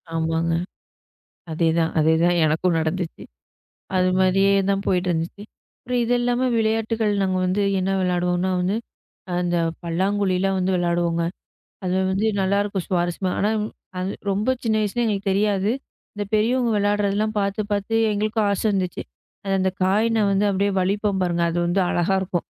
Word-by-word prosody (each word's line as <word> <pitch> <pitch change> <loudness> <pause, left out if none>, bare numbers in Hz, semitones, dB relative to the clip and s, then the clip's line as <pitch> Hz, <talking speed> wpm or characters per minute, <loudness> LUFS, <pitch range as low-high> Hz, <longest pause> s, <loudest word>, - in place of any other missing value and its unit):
ஆமாங்க. 165 +1 0 1.0
அதே 165 +1 +1
தான் 165 0 +1
அதே 155 +1 +4
தான் 175 0 +3
எனக்கும் 165 +3 +1
நடந்துச்சு. 160 +2 -3 0.7
அது 185 0 +3
மாதிரியே 195 +1 +3 0.2
தான் 195 0 0
போயிட்டு 180 -1 +1
இருந்துச்சு. 170 +4 -3 0.6
இது 235 +1 +1
இல்லாம 245 +1 +1
விளையாட்டுகள் 220 -1 0
நாங்க 190 -1 +1
வந்து 185 +3 0 0.2
என்ன 185 +1 -1
விளையாடுவோம்னா 180 0 0
வந்து, 180 +3 0 0.6
அந்த 175 0 0 0.3
பல்லாங்குழிலா 190 +2 0
வந்து 185 0 0
விளையாடுவோங்க. 170 -1 0 0.6
அது 180 0 0 0.2
வந்து 195 +3 0
நல்லா 195 +1 +2
இருக்கும் 200 -3 -3
சுவாரஸ்யமா. 175 +1 -1
ஆனா 205 - +2 0.5
அது 185 +1 -2 0.2
ரொம்ப 205 +6 0
சின்ன 220 -1 +1
வயசுல 215 +3 -1
எங்களுக்குத் 200 -3 -1
தெரியாது. 200 0 +1 0.4
அந்தப் 205 -1 -5
பெரியவங்க 235 +3 +2
விளையாடுறதெல்லாம் 205 +1 +1
பாத்து, 200 +1 -1
பாத்து 205 +2 -1 0.2
எங்களுக்கும் 215 +1 0
ஆசை 200 - -1
வந்துச்சு. 185 -2 -2 0.6
அந்த 190 0 +1
காய்ன 215 +5 +2
வந்து 195 +1 +2
அப்படியே 200 +1 +1
வலிப்போம் 200 +1 0
பாருங்க. 170 -1 0
அது 170 - -2
வந்து 175 +3 +1
அழகா 175 +3 +1
இருக்கும். 180 -2 -2
190 Hz, 145 wpm, -22 LUFS, 180-205 Hz, 1.0 s, அதே